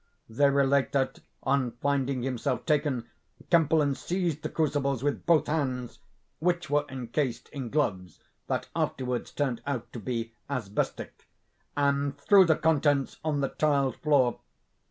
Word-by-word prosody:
They 140 +5 +3
relate 140 -1 +2
that, 135 -1 0 0.2
on 130 -3 +1
finding 140 -2 0
himself 125 -2 -2
taken, 145 -6 +1 0.4
Kempelen 160 -4 +4
seized 170 0 -2
the - - -3
crucibles 140 -4 0
with 145 0 -1
both 165 -3 +5
hands 130 -6 -2 0.4
(which 175 0 0
were 145 0 +2
encased 130 0 -3
in 130 -4 -5
gloves 95 - -1 0.3
that - - -2
afterwards 125 -2 -2
turned 135 -5 -2
out 140 -5 -3
to 120 - -5
be 115 0 -3 0.2
asbestic), 115 -8 -3 0.5
and 140 0 +1
threw 190 +6 +6
the 160 -2 +4
contents 145 -3 +1
on 150 -2 0
the 135 - 0
tiled 140 -4 +1
floor. 135 -6 +2
140 Hz, 135 wpm, -28 LUFS, 125-150 Hz, 0.5 s, threw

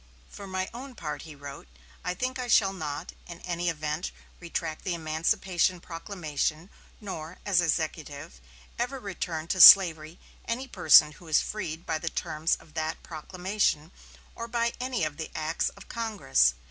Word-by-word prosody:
"For 200 - -9
my 185 0 -2
own 255 +2 -9
part," 150 -7 -5
he 155 -2 -10
wrote, 140 - -10 0.4
"I 180 - -2
think 255 +6 -3
I 250 - -3
shall 195 -5 +4
not, 150 -5 -5 0.2
in 170 -1 -9
any 175 -1 -2
event, 155 +1 -3 0.3
retract 165 -2 -4
the 185 -3 -1
emancipation 175 +3 0
proclamation; 165 -1 -4 0.3
nor, 175 -5 -7
as 190 -4 +3
Executive, 155 - -3 0.4
ever 255 +3 -2
return 175 -7 -4
to 185 - +2
slavery 165 -4 +9 0.3
any 255 +3 -2
person 160 -8 +6
who 165 +3 -15
is 155 - +4
freed 170 -6 -5
by 155 - -1
the 165 - -3
terms 155 +1 -1
of 160 -1 -18
that 160 0 -3
proclamation, 180 0 -2 0.4
or 230 - -6
by 235 0 0
any 250 -6 -2
of 155 -1 -2
the 160 - -5
acts 160 +1 -1
of 200 - -15
Congress. 135 - +1
170 Hz, 160 wpm, -28 LUFS, 155-200 Hz, 0.4 s, slavery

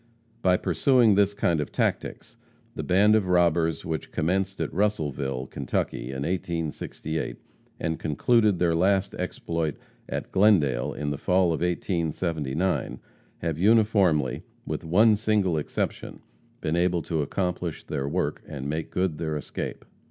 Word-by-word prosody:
By 90 -3 +4
pursuing 110 - +3
this 100 0 +3
kind 85 -5 +1
of 75 - -5
tactics, - - -2 0.4
the - - -4
band 100 +4 +4
of 110 -4 +2
robbers 85 -3 +2
which 80 -1 -4
commenced 95 +4 -1
at - - -2
Russellville, 75 -10 -1
Kentucky, - - -3
in 65 +1 -4
1868, 80 -2 -3 0.4
and 80 0 -2
concluded 105 - +2
their 85 -1 +2
last 95 +3 +2
exploit 85 -4 -3 0.3
at - - -4
Glendale, 85 - +3
in 75 -1 -3
the 70 - -4
fall 90 -1 +2
of 80 - -3
1879, 85 -2 -1 0.4
have 80 -2 -2
uniformly, 100 - +3 0.2
with - - -4
one 105 +7 +5
single 105 -5 +1
exception, 75 - -4 0.4
been 75 - -1
able 85 -1 +1
to 80 0 -1
accomplish 90 +2 -2
their 70 0 -3
work - - -1
and 70 -3 -6
make 80 +2 -3
good 90 -5 -1
their 80 -2 -2
escape. 75 - -6
85 Hz, 135 wpm, -26 LUFS, 75-95 Hz, 0.4 s, one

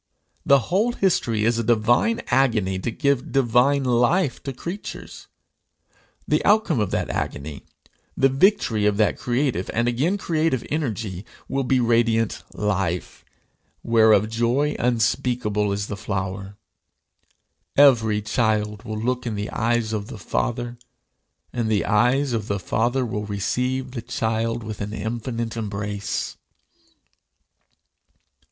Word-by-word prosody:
The 140 - +6
whole 215 +6 +2
history 115 - +1
is 115 0 +2
a - - 0
divine 120 - +2
agony 110 -8 +2
to 105 - -2
give 140 +1 0
divine 135 +2 +3
life 125 +6 +2
to 135 - -4
creatures. 175 +10 -7 1.0
The - - +1
outcome 205 - +3
of 105 -3 0
that - - -1
agony, 70 +1 -4 0.5
the 135 - +5
victory 135 - +2
of 105 -1 +1
that 110 -1 +2
creative 125 -6 -1
and 115 +1 +1
again 140 +12 +1
creative 160 - 0
energy, 110 - -3 0.2
will 135 +1 -1
be 130 +1 +2
radiant 115 -2 +2
life, 95 -4 -2 0.6
whereof 110 -2 +4
joy 120 +6 0
unspeakable 115 -3 0
is 100 0 -2
the 105 - -5
flower. 95 0 -4 1.2
Every 115 -7 +5
child 105 -2 0
will 110 -2 -5
look 125 +2 -1
in 110 - -2
the 105 0 -4
eyes 115 0 0
of 105 -1 -3
the - - -8
Father, 120 +4 -3 0.7
and 115 -2 -1
the 105 -2 +1
eyes 125 +5 +2
of 110 -2 -2
the 100 - -1
Father 120 +7 0
will 105 -2 -4
receive 125 +6 -2
the 125 -2 -5
child 115 0 -2
with 110 -1 -6
an 105 +1 -4
infinite 115 +1 -4
embrace. 105 -1 -3
115 Hz, 130 wpm, -23 LUFS, 105-130 Hz, 1.2 s, The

